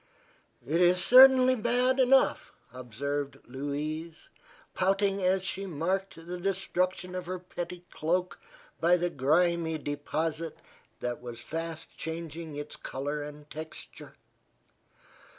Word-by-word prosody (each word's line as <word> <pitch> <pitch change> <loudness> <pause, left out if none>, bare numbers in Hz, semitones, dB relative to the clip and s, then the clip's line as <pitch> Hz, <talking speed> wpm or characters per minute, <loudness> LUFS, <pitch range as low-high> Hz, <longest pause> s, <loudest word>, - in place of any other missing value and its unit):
"It 165 +5 +1
is 180 0 +4
certainly 255 0 +8
bad 250 +3 +2
enough," 265 +1 +4 0.2
observed 140 +4 -4
Louise, 150 +5 -5 0.4
pouting 195 +1 +1
as 185 0 +2
she 190 +2 -2
marked 185 +4 -2
the 180 +1 -5
destruction 185 -1 -1
of 180 -1 -5
her 185 +1 -3
pretty 180 0 -7
cloak 180 +3 -1 0.4
by 175 +2 +4
the 175 0 -1
grimy 160 +3 +2
deposit 155 +2 -3 0.4
that 120 0 -3
was 120 -1 -7
fast 165 +5 -6
changing 160 -1 -6
its 145 +1 -5
color 145 +3 -4
and 150 0 -9
texture. 160 +1 -9
170 Hz, 115 wpm, -29 LUFS, 150-185 Hz, 0.4 s, certainly